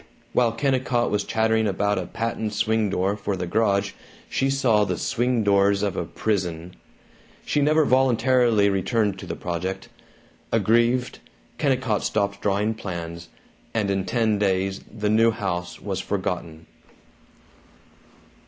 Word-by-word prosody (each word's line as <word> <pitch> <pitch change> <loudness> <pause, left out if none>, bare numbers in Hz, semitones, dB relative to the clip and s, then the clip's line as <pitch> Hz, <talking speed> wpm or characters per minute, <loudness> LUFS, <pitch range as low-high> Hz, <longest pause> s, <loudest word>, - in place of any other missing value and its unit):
While 120 -2 +3
Kennicott 130 -1 0
was 105 -1 +1
chattering 110 0 +1
about 100 +1 0
a - - -5
patent 110 -1 -3
swing 110 0 +1
door 95 +2 0
for 100 -1 -3
the 90 - -3
garage 100 +1 +1 0.4
she 135 - 0
saw 125 -6 +3
the 90 -3 -2
swing 120 -1 0
doors 100 0 +3
of 100 -3 -1
a - - -2
prison. 90 -5 -3 0.7
She 145 - +1
never 155 +2 +3
voluntarily 125 -4 +3
returned 100 +1 0
to - - -9
the - - -4
project. 90 +2 -4 0.6
Aggrieved, 120 +2 +2 0.4
Kennicott 130 -7 +1
stopped 100 -1 -1
drawing 105 +2 +1
plans, 85 -5 -6 0.5
and 105 -3 +1
in 95 -1 0
ten 110 -3 +1
days 95 -1 0
the 105 -1 -3
new 115 +1 +5
house 90 -6 -3
was 100 -2 -4
forgotten. 85 -5 -4
105 Hz, 135 wpm, -24 LUFS, 95-115 Hz, 0.7 s, new